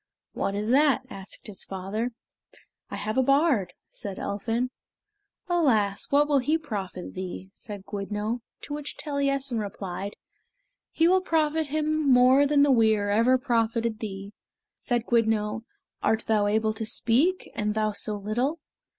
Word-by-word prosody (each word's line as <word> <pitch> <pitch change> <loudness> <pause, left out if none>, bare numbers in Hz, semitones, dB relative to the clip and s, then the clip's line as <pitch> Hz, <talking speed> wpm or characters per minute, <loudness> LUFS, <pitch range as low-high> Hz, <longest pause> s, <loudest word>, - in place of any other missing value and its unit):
"What 195 - -2
is 210 +2 -2
that?" 280 +1 +4
asked 195 0 -9
the 210 - -7
father. 195 +5 -3 0.8
"I - - -5
have 215 +5 -1
a - - +6
bard," 275 - +2 0.2
said 200 -2 -7
Elphin. 230 +5 -2 0.8
"Alas, 225 - +2
what 290 +1 +4
will 285 -2 +3
he 300 +5 +1
profit 200 - -6
thee?" 185 +1 -6
said 205 -3 -8
Gwyddno, 210 +3 -3 0.2
to 290 - -7
which 295 0 -5
Taliessin 275 -4 -1
replied, 200 -1 -5 0.7
"He 325 - +3
will 375 +1 +4
profit 320 -3 +1
him 310 0 0
more 255 +3 +6
than 285 0 +4
the 285 - +4
weir 220 -4 +3
ever 230 +5 +4
profited 230 -3 0
thee." 200 -2 -6 0.4
Said 240 -3 -1
Gwyddno, 225 -1 +1 0.4
"Art 220 0 +1
thou 210 -2 +2
able 215 +1 +1
to 220 0 -4
speak, 290 +14 +1
and 210 0 -1
thou 215 -1 +1
so 210 +1 -2
little?" 240 +10 -1
230 Hz, 145 wpm, -26 LUFS, 205-280 Hz, 0.8 s, a